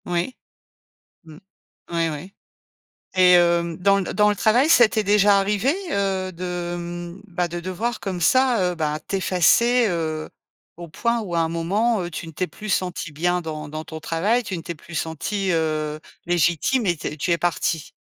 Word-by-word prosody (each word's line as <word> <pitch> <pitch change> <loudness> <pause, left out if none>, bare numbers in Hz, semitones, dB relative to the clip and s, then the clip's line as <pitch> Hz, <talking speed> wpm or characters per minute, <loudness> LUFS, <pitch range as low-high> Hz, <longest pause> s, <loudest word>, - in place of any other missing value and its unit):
Oui, 175 +8 -2 0.9
mmh, 155 -1 -13 0.5
oui 165 -1 +1
oui. 155 +6 -7 0.8
Et 185 -1 +6
hem, 170 -1 +3
dans 200 +2 +3
le 185 - -4
dans 210 0 +4
le 210 - +2
travail, 230 +8 +3
ça 240 -8 +7
t'est 215 -1 -1
déjà 205 0 +5
arrivé, 210 +7 +1 0.2
heu, 190 -1 -1
de, 175 0 -4
hem, 175 +1 -7
bah, 180 -1 -1
de 175 +1 -5
devoir 190 +7 -3
comme 185 -3 -4
ça, 255 +5 +3
heu, - - -6
ben, 155 -2 -2
t'effacer, 205 +6 +3
heu, 160 -3 -2 0.5
au 170 0 -9
point 235 +8 -1
où 190 -6 -5
à - - +2
un 165 - +1
moment, 195 +7 0
heu, 175 - -5
tu 165 - -6
ne 160 - -9
t'es 185 +4 -2
plus 215 - -9
sentie 180 -3 -2
bien 175 +4 0
dans 155 -2 -6
dans 155 +1 -6
ton 160 0 -8
travail, 200 +10 0
tu 205 -5 -4
ne 165 - -7
t'es 170 - -5
plus 170 +2 -13
sentie, 185 +6 -2
heu, 155 -2 -1 0.3
légitime 175 - +1
et 175 -2 +1
tu - - -7
es 150 - -7
tu 155 - -2
es 170 - +1
partie? 165 -2 -1
175 Hz, 190 wpm, -22 LUFS, 165-200 Hz, 0.9 s, ça